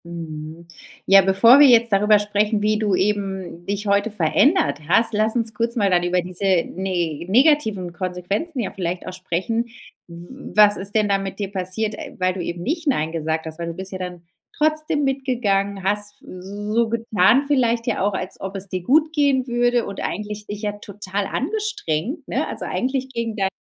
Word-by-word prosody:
Mhm. 165 -1 -8 0.4
Ja, 195 0 +7
bevor 195 +8 +6
wir 290 - +9
jetzt 235 -2 +5
darüber 210 +2 +5
sprechen, 205 +1 0
wie 215 0 +1
du 210 -3 +1
eben 190 -3 -2
dich 205 +1 -2
heute 200 +2 +2
verändert 215 - +2
hast, 225 +7 +3
lass 215 +2 +1
uns 230 -2 -1
kurz 235 +1 0
mal 205 -4 +2
dann 175 -1 +3
über 180 0 +1
diese 180 +2 -7 0.2
ne 175 -4 -3
negativen 220 - +2
Konsequenzen 185 - -3
ja 210 - -3
vielleicht 180 -2 -4
auch 185 - -5
sprechen. 185 +6 -2 0.4
W 175 +10 -10
was 210 -1 +7
ist 200 +2 +1
denn 215 -1 +3
da 200 -1 +2
mit 195 0 -6
dir 200 -1 -3
passiert, 195 +3 -1
äh, - - -9
weil 185 0 +1
du 185 - -5
eben 170 0 -5
nicht 320 - -3
„Nein“ 160 - +1
gesagt 160 0 -2
hast? 160 +1 -7
Weil 170 - -4
du 170 - -4
bist 190 +1 -6
ja 185 - -6
dann 180 -2 -7 0.3
trotzdem 305 -1 +1
mitgegangen, 225 -8 -1
hast 205 +1 -1
so 205 +5 -3
getan 230 +2 +3
vielleicht 240 -5 +1
ja 235 - 0
auch, 205 - 0
als 185 -1 -4
ob 195 +1 -6
es 195 0 0
dir 185 -1 -4
gut 310 - +3
gehen 280 -4 +2
würde, 240 0 +1
und 200 - -6
eigentlich 210 0 -5
dich 205 +1 -7
ja 205 -1 -1
total 205 -1 -4
angestrengt, 280 - -3
ne? - - -1
Also, - - -5
eigentlich 260 +1 -2
gegen 230 -3 -4
deine 195 -3 0
205 Hz, 190 wpm, -21 LUFS, 185-235 Hz, 0.4 s, wir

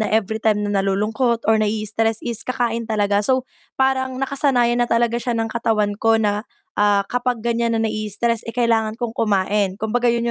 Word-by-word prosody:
na 215 - +1
everytime 220 0 +1
na 205 - -2
nalulungkot 215 +5 0
or 220 - +4
nai-istress 215 +1 -1
is 235 -2 -2
kakain 235 -2 -1
talaga, 205 -2 +1
so, 260 -1 +2 0.3
parang 260 -1 +1
nakasanayan 255 -3 +1
na 240 - +2
talaga 235 0 +1
siya 240 -1 -2
ng 225 0 -1
katawan 220 -3 0
ko 225 0 +3
na, 210 +1 -1 0.3
ah, 205 -1 +3
kapag 245 -2 -1
ganyan 235 -1 0
na 225 - 0
nai-istress, 215 +2 -2
eh, 230 - -5
kailangan 225 -3 +1
kong 240 -2 -3
kumain. 200 -2 +1
Kumbaga 235 +3 -1
'yun 235 0 +1
225 Hz, 175 wpm, -20 LUFS, 210-240 Hz, 0.3 s, or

